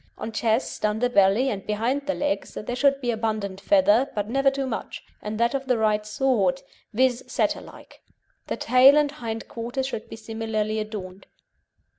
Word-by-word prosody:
On 225 - -5
chest 225 +1 -1
under 215 +3 +1
belly, 210 +4 +3
and 195 -2 -4
behind 240 +7 -1
the 290 - 0
legs, 290 0 -2
there 245 +3 -4
should 275 +1 +3
be 245 -2 0
abundant 215 -4 -3
feather, 205 +8 +4
but 205 -1 -2
never 275 +4 +3
too 275 0 -3
much, 240 -4 -5 0.2
and 215 +1 -5
that 235 +2 +2
of 270 -1 -3
the 250 -2 +2
right 215 -1 +1
sort, 215 -7 +1 0.3
viz., 250 +1 +1
Setter - - 0
like. - - -15 0.5
The - - -3
tail 260 +3 +6
and 295 -1 +3
hind 225 -6 -6
quarters 240 +3 -4
should 265 -5 -5
be - - -7
similarly 220 -1 -3
adorned. 195 -3 -7
225 Hz, 175 wpm, -25 LUFS, 210-260 Hz, 0.5 s, tail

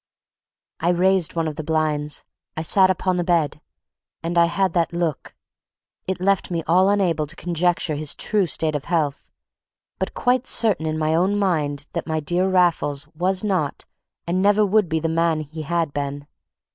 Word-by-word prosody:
I 170 - +1
raised 180 -1 +2
one 165 -1 0
of 150 - -5
the 155 - -4
blinds, 150 -2 -1 0.3
I 160 - -2
sat 185 +3 +4
upon 185 0 0
the 175 - 0
bed, 165 -4 0 0.6
and 170 +1 -2
I 170 0 +6
had 185 +1 0
that 170 -1 0
look. 170 -4 -3 0.7
It 190 -1 -2
left 195 +1 +1
me 170 -2 -2
all 185 +4 +4
unable 175 -7 +1
to 160 - -9
conjecture 175 -1 0
his 150 0 -2
true 205 -4 0
state 160 0 0
of 145 -1 -3
health, 155 -5 -1 0.7
but - - -3
quite 250 +1 +1
certain 195 -8 +2
in 155 0 -2
my 155 0 0
own 185 +5 +2
mind 150 -7 0
that - - -4
my 160 -1 -1
dear 175 +5 0
Raffles 165 -6 +1
was 185 +4 0
not 185 -9 -1 0.4
and 180 +2 0
never 205 +1 +4
would 205 -2 +2
be 160 - 0
the 165 - -1
man 165 0 +1
that 155 -2 -6
he 160 0 -6
had 165 -1 -1
been. 145 0 -4
170 Hz, 185 wpm, -22 LUFS, 155-185 Hz, 0.7 s, I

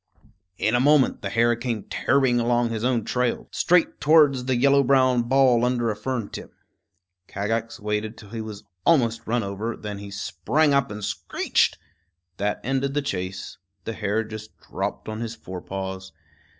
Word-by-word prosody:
In 110 - +1
a 120 - +4
moment 145 0 +4
the 100 - -3
hare 120 +3 +3
came 120 -3 -3
tearing 130 -2 +2
along 120 0 +2
on - - -5
his 110 -1 -3
own 120 -3 +1
trail 125 -1 -1
straight 180 -1 +2
towards 145 -4 +5
the 130 0 +1
yellow 140 +3 +4
brown 130 -2 +4
ball 125 -1 +3
under 120 -2 +1
a - - -4
fern 115 0 -3
tip. - - -9 0.7
Kagax 110 +3 -3
waited 105 +1 -3
till 105 - -13
he 115 -1 -4
was 110 -1 -8 0.2
almost 115 -8 +2
run 120 +1 +1
over; 100 +4 -4
then 105 -2 -6
he 100 0 -8
sprang 100 - 0
up 140 -3 +2
and 105 -1 -5
screeched. 95 -4 0 0.6
That 105 +1 -1
ended 135 +2 -1
the 145 - +1
chase. 95 -7 -4 0.2
The 115 - -4
hare 105 +1 -1
just 110 0 -9
dropped - - -5
on 110 0 -4
his 115 -1 -4
fore 95 -4 -8
paws. 95 0 -6
115 Hz, 175 wpm, -24 LUFS, 105-130 Hz, 0.7 s, towards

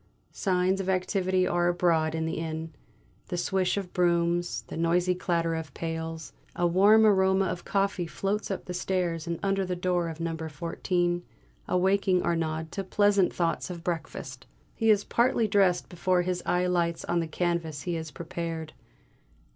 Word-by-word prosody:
Signs 185 0 +1
of 190 - -3
activity 185 0 +1
are 175 -1 +1
abroad 165 -3 +2
in 160 0 -1
the 160 - -2
inn; 160 0 -4 0.5
the 175 - -3
swish 185 +2 0
of 190 -3 -4
brooms; 175 0 +1
the - - -9
noisy 175 +2 +2
clatter 170 -2 0
of 160 -3 -5
pails. 165 -1 -5 0.2
A 175 - +1
warm 200 +6 +6
aroma 190 -2 +4
of 175 0 -4
coffee 195 -3 0
floats 200 +4 -2
up 195 - -4
the 180 - -5
stairs 175 -3 -1
and 170 0 -2
under 195 -1 +1
the 180 -1 -2
door 175 -1 0
of 160 0 -8
number 165 -1 -3
fourteen, 175 +2 -1 0.5
awaking 190 0 +2
Arnaud 160 -1 -1
to 195 - -3
pleasant 200 0 +3
thoughts 170 +1 -1
of 170 -2 -7
breakfast. 135 -6 -5 0.3
He 225 - +1
is 205 -1 +5
partly 235 -2 +2
dressed 195 -3 +3
before 180 0 +1
his 180 0 -2
eye 180 0 +2
lights 170 -2 0
on 175 - +1
the 165 - -1
canvas 165 -3 -2
he 175 - -2
had 160 -2 -4
prepared. 165 -1 -5
175 Hz, 165 wpm, -28 LUFS, 165-190 Hz, 0.5 s, warm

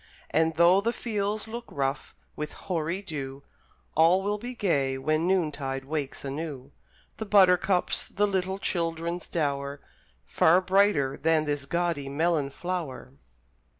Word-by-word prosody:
And 160 0 +2
though 175 +3 +5
the 230 +3 0
fields 210 -2 -2
look 235 +2 -6
rough 135 -1 -3 0.2
with 150 - -5
hoary 175 +2 -3
dew, 140 -5 -6 0.5
All 170 +4 +5
will 205 +1 -1
be 245 +3 -6
gay 140 - +1
when 155 +5 0
noontide 145 -7 -1
wakes 140 -1 -4
anew 140 -1 -5 0.5
The 220 - -5
buttercups, 185 -2 +3
the 205 - +1
little 190 -1 -1
children's 170 -2 -2
dower, 140 -3 -2 0.5
Far 170 - +4
brighter 185 -8 +2
than 160 0 +2
this 145 -1 -2
gaudy 170 -5 -1
melon 155 0 +1
flower! 150 - -5
165 Hz, 130 wpm, -27 LUFS, 140-190 Hz, 0.5 s, though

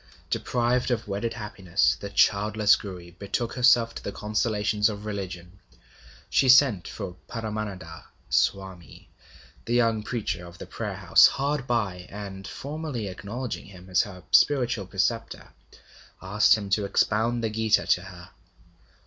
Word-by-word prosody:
Deprived 125 +1 0
of 120 -3 -1
wedded 105 +3 -2
happiness, 100 -4 0
the 100 - -6
childless 105 +1 +3
Gouri 90 -4 -9
betook 100 +6 -3
herself 120 -2 +4
to - - -8
the - - -4
consolations 105 0 0
of 105 0 -7
religion. 95 -3 -6 0.7
She 135 - +2
sent 125 - +5
for 90 - -7
Paramananda 105 -7 -6 0.2
Swami, 95 -3 -2 0.5
the 120 - 0
young 115 -3 +2
preacher 105 -6 -3
of 85 0 -13
the - - -8
Prayer - - -5
House - - +6
hard 140 -1 -2
by, 95 -7 -1
and, 95 -1 -8
formally 145 -7 -5
acknowledging 110 +7 -6
him 95 -1 -14
as 90 - +4
her 95 -5 -8
spiritual 120 - +3
preceptor, 110 +4 -2 0.7
asked 105 +4 +4
him 100 -2 -7
to 100 +1 +2
expound 110 +4 +1
the 110 - -1
Gita 110 0 +2
to 90 - +2
her. 90 -2 -12
105 Hz, 140 wpm, -26 LUFS, 95-115 Hz, 0.7 s, House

